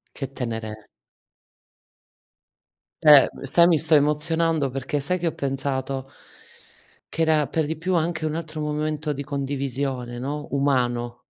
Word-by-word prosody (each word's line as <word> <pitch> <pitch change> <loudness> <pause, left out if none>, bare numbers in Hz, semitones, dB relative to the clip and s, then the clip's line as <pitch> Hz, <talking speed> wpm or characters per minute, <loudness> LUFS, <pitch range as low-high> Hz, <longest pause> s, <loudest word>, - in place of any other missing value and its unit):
Che 135 -2 -5
tenere 110 -4 -5 2.2
Eh, 150 -3 +8
m - - -11
sai 170 +6 +5
mi 165 -3 +4
sto 155 +2 +3
emozionando. 150 0 +2
Perché 135 +3 -3
sai 180 +7 -1
che 175 -1 0
ho - - -3
pensato? 135 -1 -3 1.1
Che 165 - 0
era, 155 -2 +3
per 160 - 0
di 160 +1 -3
più, 180 +3 -1
anche 160 -1 0
un 155 - -2
altro 160 -1 -5
momento 150 0 -2
di 140 +1 -5
condivisione, 135 -3 -3
no, 145 +4 -4
umano. 120 -4 0
145 Hz, 135 wpm, -24 LUFS, 135-155 Hz, 2.2 s, Eh